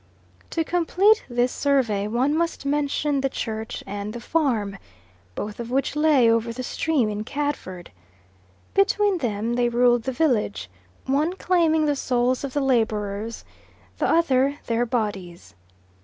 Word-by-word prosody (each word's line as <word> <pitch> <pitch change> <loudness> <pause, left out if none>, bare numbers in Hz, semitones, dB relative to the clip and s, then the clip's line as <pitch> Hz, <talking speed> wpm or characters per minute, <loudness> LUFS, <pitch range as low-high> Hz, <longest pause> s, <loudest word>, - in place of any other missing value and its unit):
To 325 - -1
complete 360 +6 +3
this 245 +1 +1
survey 235 -8 +1
one 250 +6 +1
must 330 -3 -1
mention 285 0 0
the 270 - 0
church 220 -3 -5
and 205 +1 -5
the 240 - -6
farm, 230 - -1 0.6
both 210 +1 -5
of 235 0 -5
which 270 +3 0
lay 300 -5 +4
over 230 0 +2
the 255 +2 -6
stream 285 -2 0
in 210 0 -3
Cadford. 270 -10 -4 0.8
Between 395 -1 +2
them 225 -3 -2
they 240 0 +2
ruled 240 0 +3
the 265 - -3
village, 160 - 0 0.3
one 295 +6 +1
claiming 335 -4 +2
the 290 -1 +1
souls 255 -1 0
of 275 -2 -4
the 290 - 0
labourers, 220 -4 -1 0.5
the - - +1
other 280 -4 +2
their 235 +1 0
bodies. 205 -7 -4
250 Hz, 140 wpm, -24 LUFS, 220-295 Hz, 0.8 s, lay